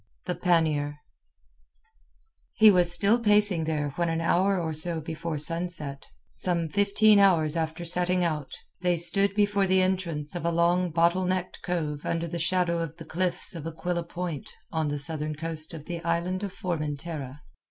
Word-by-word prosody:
THE 180 - -2
PANNIER 160 -4 0 1.6
He 215 -1 +6
was 175 -2 +4
still 200 +7 +3
pacing 205 -6 +3
there 150 -2 -2
when 170 -1 0
an 165 0 -2
hour 185 +3 +1
or 160 -2 -3
so 160 +2 +9
before 160 0 -6
sunset—some 165 - -3
fifteen 205 +4 +3
hours 165 -6 +3
after 165 +1 -4
setting 180 +1 +3
out—they 170 +3 -4
stood 195 +4 +3
before 205 -1 +1
the 185 0 +2
entrance 170 -6 -3
of 175 - -5
a 170 - 0
long 175 +2 +1
bottle 170 +3 +1
necked 185 0 -3
cove 155 -4 -4
under 170 0 -3
the 170 +1 -5
shadow 175 0 0
of 165 -1 -6
the 165 - -11
cliffs 175 +3 -2
of 165 -2 -7
Aquila 170 +2 -4
Point 170 -4 -6 0.2
on 160 -2 -2
the 145 0 -3
southern 155 +1 -2
coast 160 0 -3
of 155 -3 -10
the 170 -1 -6
Island 170 +3 -2
of 200 -2 -5
Formentera. 150 -5 -5
170 Hz, 160 wpm, -26 LUFS, 160-180 Hz, 1.6 s, so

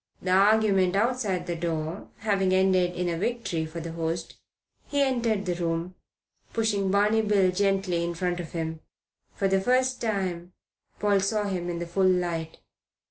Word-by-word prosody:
The 185 - -2
argument 195 -1 +4
outside 215 -3 0
the 175 - -3
door 165 -1 -3
having 195 -3 +1
ended 185 -2 +3
in 180 0 -1
a 170 -1 -1
victory 195 -8 -2
for 165 +2 -7
the 165 0 -6
host, 165 0 -3 0.5
he 285 - -1
entered 230 -6 0
the 180 - 0
room, 170 +1 -2 0.6
pushing 210 -4 +1
Barney 210 +3 +3
Bill 200 -3 +3
gently 195 -2 +1
in 170 0 -3
front 180 0 -1
of 170 -3 -7
him. 160 -1 -3 0.6
For 195 - +1
the 195 0 +2
first 255 +3 +1
time 185 -5 -2 0.5
Paul 205 -1 +3
saw 210 +2 0
him 185 -3 -3
in 170 - -3
the 170 - -3
full 185 +3 +1
light. 170 -3 -1
185 Hz, 165 wpm, -27 LUFS, 170-205 Hz, 0.6 s, argument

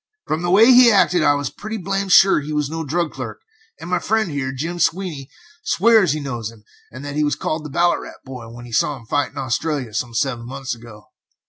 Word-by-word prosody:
From 155 - -2
the 175 - -1
way 200 +5 +6
he 250 -1 +8
acted 180 -4 +3
I 145 -1 +4
was 145 -2 -3
pretty 220 +1 -6
blamed 195 0 -2
sure 195 -1 +6
he 150 +1 -6
was 150 -1 -1
no 165 0 -3
drug 160 +2 -1
clerk - - -7 0.4
and - - -8
my 180 0 0
friend 215 -2 0
here, 140 -2 -3
Jim 165 +6 -4
Sweeney, 165 -7 -1 0.3
swears 215 -5 +4
he 155 - -3
knows 120 -6 -4
him, 115 -2 -17 0.3
and 130 +4 -9
that 145 0 -6
he 150 - +1
was 145 - +1
called 155 0 -3
the 150 - -7
'Ballarat 175 +5 -1
Boy' 125 -4 -9
when 120 +1 -11
he 120 - -12
saw 140 +5 +1
him 115 - -15
fight 145 +4 0
in - - -17
Australia, 130 -1 -2
some 120 +1 -3
seven 120 -1 -1
months 135 0 -5
ago. 115 -3 -13
150 Hz, 230 wpm, -20 LUFS, 130-175 Hz, 0.4 s, he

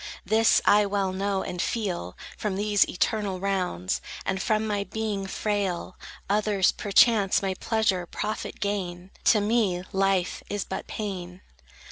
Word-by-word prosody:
This 220 +3 +4
I 205 0 +5
well 195 -2 0
know, 195 0 -1
and 180 - -3
feel; 180 - -2 0.2
From 210 -3 -2
these 205 0 +2
eternal 200 0 -1
rounds, 180 - -1 0.2
And 190 0 -1
from 215 -1 +1
my 205 -2 -1
being 210 -2 -3
frail, 195 -3 -2 0.3
Others, 205 -2 +2
perchance, 205 -1 +3
may 190 -1 0
pleasure, 195 -3 0
profit 215 +5 -4
gain; 185 -2 -3
To 215 - +6
me 205 -4 +1
life 195 -2 +1
is 205 -2 -2
but 190 - -5
pain. 185 -4 -5
195 Hz, 135 wpm, -26 LUFS, 185-210 Hz, 0.3 s, To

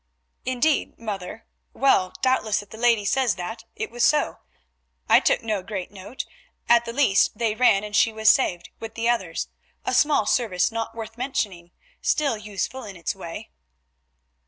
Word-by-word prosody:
"Indeed, 255 +4 +1
mother; 210 -2 -6 0.3
well, 190 -9 +3
doubtless 220 -5 +2
if 205 - -22
the 220 - -9
lady 230 -3 +3
says 250 +1 +2
that, 220 +6 -6
it - - -4
was 240 0 -1
so. 300 0 +2 0.7
I - - +7
took - - +1
no 215 -3 -1
great 190 -1 -5
note; 200 +6 -7 0.4
at 235 0 +5
the 230 - -4
least 235 -6 +3
they 230 -3 +1
ran 215 -3 +4
and 210 -1 -5
she 225 - +4
was 220 0 -3
saved, 175 -8 +3
with 225 0 -8
the 230 0 -1
others; 190 -9 -1 0.4
a - - -1
small 295 -8 +4
service 205 -7 +1
not 225 0 -4
worth 225 +1 -8
mentioning, 205 -10 -2 0.3
still 290 -6 +1
useful 210 +5 -4
in 200 -3 -9
its 170 -2 -3
way." 170 -4 -8
220 Hz, 165 wpm, -24 LUFS, 195-240 Hz, 0.7 s, I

